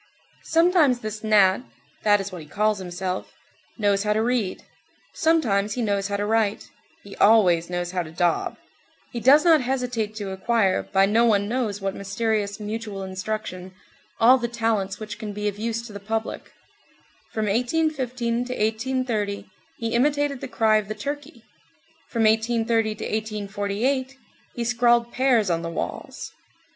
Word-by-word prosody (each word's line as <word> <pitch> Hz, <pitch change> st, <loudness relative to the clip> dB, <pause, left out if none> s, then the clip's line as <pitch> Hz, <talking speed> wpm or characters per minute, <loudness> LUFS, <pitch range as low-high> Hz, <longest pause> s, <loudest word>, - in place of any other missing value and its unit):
Sometimes 325 Hz, -7 st, +3 dB
this 215 Hz, 0 st, -6 dB
gnat—that 210 Hz, 0 st, +2 dB
is 195 Hz, 0 st, -5 dB
what 180 Hz, -2 st, -7 dB
he 150 Hz, -, -12 dB
calls 210 Hz, +5 st, 0 dB
himself—knows 190 Hz, +3 st, -3 dB
how 210 Hz, 0 st, +1 dB
to 220 Hz, +1 st, +1 dB
read; 235 Hz, -5 st, -1 dB, 0.5 s
sometimes 215 Hz, -11 st, +1 dB
he 250 Hz, -, -2 dB
knows 200 Hz, -2 st, 0 dB
how 200 Hz, 0 st, -2 dB
to 205 Hz, -, -1 dB
write; 220 Hz, -1 st, 0 dB, 0.3 s
he 200 Hz, -, -11 dB
always 180 Hz, -6 st, +4 dB
knows 175 Hz, 0 st, -3 dB
how 185 Hz, -1 st, -1 dB
to 165 Hz, -, -7 dB
daub. 170 Hz, 0 st, 0 dB, 0.5 s
He 240 Hz, -, -4 dB
does 275 Hz, +7 st, +6 dB
not 320 Hz, -4 st, +6 dB
hesitate 245 Hz, -4 st, -2 dB
to 205 Hz, -3 st, -5 dB
acquire, 195 Hz, 0 st, +1 dB
by 195 Hz, 0 st, +2 dB
no 225 Hz, +4 st, +3 dB
one 205 Hz, -3 st, +3 dB
knows 220 Hz, -4 st, -2 dB
what 195 Hz, 0 st, -2 dB
mysterious 205 Hz, +1 st, -2 dB
mutual 210 Hz, -2 st, -5 dB
instruction, 190 Hz, -1 st, -5 dB, 0.4 s
all 255 Hz, +3 st, +6 dB
the 240 Hz, -, -1 dB
talents 225 Hz, -4 st, -1 dB
which 215 Hz, 0 st, -7 dB
can 215 Hz, -3 st, -5 dB
be 210 Hz, +1 st, -3 dB
of 205 Hz, 0 st, -3 dB
use 230 Hz, +1 st, -2 dB
to 220 Hz, -, -10 dB
the 205 Hz, -, -6 dB
public; 220 Hz, +2 st, -4 dB, 0.8 s
from 220 Hz, -1 st, -1 dB
1815 245 Hz, 0 st, 0 dB
to 250 Hz, -, -4 dB
1830, 220 Hz, -3 st, -1 dB, 0.3 s
he 230 Hz, -, -3 dB
imitated 285 Hz, +2 st, +1 dB
the -, -, -4 dB
cry 220 Hz, -3 st, +3 dB
of 210 Hz, -2 st, -2 dB
the 215 Hz, -, -4 dB
turkey; 280 Hz, +1 st, -6 dB, 0.7 s
from 230 Hz, -2 st, 0 dB
1830 225 Hz, 0 st, +2 dB
to -, -, -7 dB
1848, 215 Hz, +5 st, -2 dB, 0.4 s
he 240 Hz, -, -2 dB
scrawled 235 Hz, 0 st, +2 dB
pears 240 Hz, -7 st, +2 dB
on 165 Hz, 0 st, 0 dB
the 170 Hz, -, -4 dB
walls. 165 Hz, -, -5 dB
215 Hz, 155 wpm, -24 LUFS, 200-240 Hz, 0.8 s, does